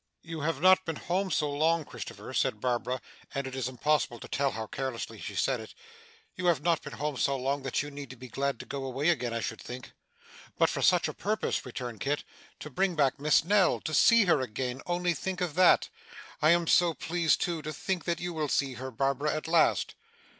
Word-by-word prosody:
'You 165 -1 -6
have 150 -2 -1
not 185 0 +7
been 165 -3 -3
home 185 +5 -1
so 150 -2 +1
long, 160 +2 +2
Christopher,' - - -8
said 105 - +1
Barbara 125 +1 -1 0.4
and 140 0 -1
it 130 - -6
is 130 -2 -1
impossible 130 -1 0
to - - -8
tell 140 0 +1
how 110 -3 -5
carelessly 130 +1 -5
she - - -6
said - - +1
it - - -10 0.6
'You 180 - -2
have 170 -4 +2
not 170 -2 +2
been - - -8
home 150 -1 -3
so 140 - +1
long, 135 +2 -1
that 135 +1 -1
you 145 - -7
need 140 -2 -8
to 135 - -9
be 130 +1 -10
glad 140 +3 -2
to - - -10
go 140 -1 -5
away 135 +5 0
again, 125 -8 +1
I 115 0 -2
should - - -4
think.' 125 0 -8 0.7
'But - - +4
for - - -3
such - - +4
a - - -4
purpose,' - - -2
returned 120 -3 -6
Kit. 145 +2 -1 0.4
'To 150 - -8
bring 185 +4 +1
back 140 -3 +2
Miss 150 +1 +4
Nell! 195 0 +3
To 155 - -4
see 230 +9 +6
her 170 -6 +3
again! 125 +2 -3
Only 175 0 +1
think 185 +4 -4
of 180 -5 -1
that! 180 +2 +5 0.5
I 155 - +5
am 170 0 +4
so 170 0 +4
pleased 170 -2 +1
too, 170 -3 -1
to 155 +1 -5
think 185 +2 -3
that 170 -1 -1
you 175 0 -4
will 155 -2 -2
see 135 -1 +1
her, 130 +1 -6
Barbara, 140 +4 0
at 155 - -4
last. 165 0 +3
150 Hz, 225 wpm, -29 LUFS, 130-170 Hz, 0.7 s, not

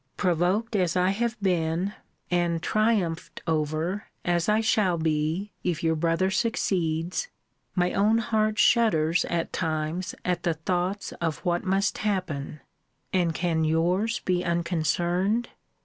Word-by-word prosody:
Provoked 185 +5 +1
as 180 -4 +1
I 180 0 +3
have 235 +3 -1
been, 175 +1 0 0.4
and 170 -1 +1
triumphed 215 -7 0
over 160 +5 -1 0.2
as 175 +1 +1
I 210 +1 +4
shall 210 -5 +2
be, 160 +5 -1
if 170 -2 -1
your 160 0 +2
brother 165 +4 +1
succeeds, 180 - 0 0.5
my 180 -1 +1
own 210 +3 +3
heart 215 -1 +1
shudders, 170 -11 +3
at 170 -1 -2
times, 160 +1 -2
at 180 -1 0
the 170 -2 0
thoughts 180 +5 -2
of 165 -2 0
what 175 0 +1
must 195 +1 0
happen: 175 -9 -2 0.5
And 175 -3 +1
can 165 -1 0
yours 180 +9 +1
be 180 -1 0
unconcerned? 175 +5 0
175 Hz, 130 wpm, -26 LUFS, 165-200 Hz, 0.5 s, I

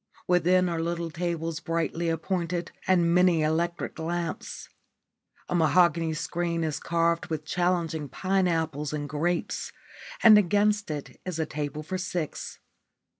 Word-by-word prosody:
Within 180 +1 +4
are 165 -2 -1
little 170 0 -2
tables 165 -1 -2
brightly 165 -1 -1
appointed 170 +1 -2 0.2
and 175 -2 +4
many 180 -3 +4
electric 170 +2 -1
lights. 170 +1 -4 0.8
A - - -3
mahogany 165 -1 +3
screen 170 +1 -2
is 155 -2 -2
carved 170 +1 +1
with 155 -2 -4
challenging 170 -4 0
pine 190 +5 +1
apples 160 -3 -1
and 145 -1 -3
grapes, 165 +5 -2 0.5
and 215 -2 +9
against 205 +1 +2
it 150 -2 -6
is 180 -3 -4
a 160 - 0
table 150 0 -4
for 185 +4 -4
six. 180 -4 -4
170 Hz, 130 wpm, -27 LUFS, 160-180 Hz, 0.8 s, and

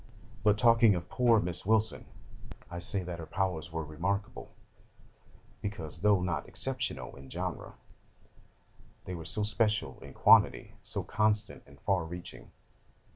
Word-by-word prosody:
'But 105 0 +4
talking 115 -3 +5
of 85 -1 -5
poor 120 -3 +4
Miss 90 -2 -2
Wilson, 110 +1 +1 0.7
I 85 - -5
say 95 +2 +1
that 85 -1 -6
her 80 - -7
powers 90 -3 -2
were 80 0 -3
remarkable, 90 +7 -3 1.1
because, 95 -8 -6
though 105 -2 +4
not 90 -2 -2
exceptional 130 -3 0
in 65 0 -13
genre, - - -5 1.3
they 90 - -5
were 85 -2 -7
so 80 +7 0
special 105 - 0
in - - -12
quantity, - - +5
so - - -4
"constant," 105 0 0
and 70 0 -17
"far 95 -4 +1
reaching." 90 +2 -9
95 Hz, 135 wpm, -30 LUFS, 85-105 Hz, 1.3 s, talking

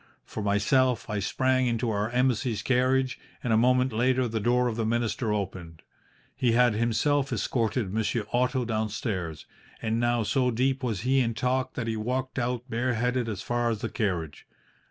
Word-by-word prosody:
For 110 - -6
myself, 115 +4 +2
I 105 - -1
sprang 130 +7 +1
into 115 0 0
our 105 +1 -1
Embassy's 125 -3 0
carriage, 130 +1 +1 0.2
and 115 - +1
a - - +5
moment 125 +2 +3
later 125 +2 +2
the 110 -1 -2
door 125 +3 +2
of 115 - -2
the 115 - -1
minister 115 0 0
opened. 90 -5 -4 0.5
He 120 -2 +1
had 120 -1 +4
himself 130 +5 +1
escorted 115 -3 -1
Monsieur 110 0 -1
Otto 125 +1 +1
downstairs, 105 -7 -3 0.3
and 110 +1 -1
now 120 -1 +1
so 125 +3 +1
deep 130 +3 0
was 115 -7 -2
he 130 +3 +2
in 115 -3 0
talk 130 +2 -1
that 115 - -2
he 115 -1 -2
walked 130 +4 -2
out 125 0 -2
bareheaded 125 0 0
as 100 -3 -4
far 120 0 0
as 110 -2 -2
the - - -2
carriage. 90 -9 -3
120 Hz, 175 wpm, -27 LUFS, 110-125 Hz, 0.5 s, a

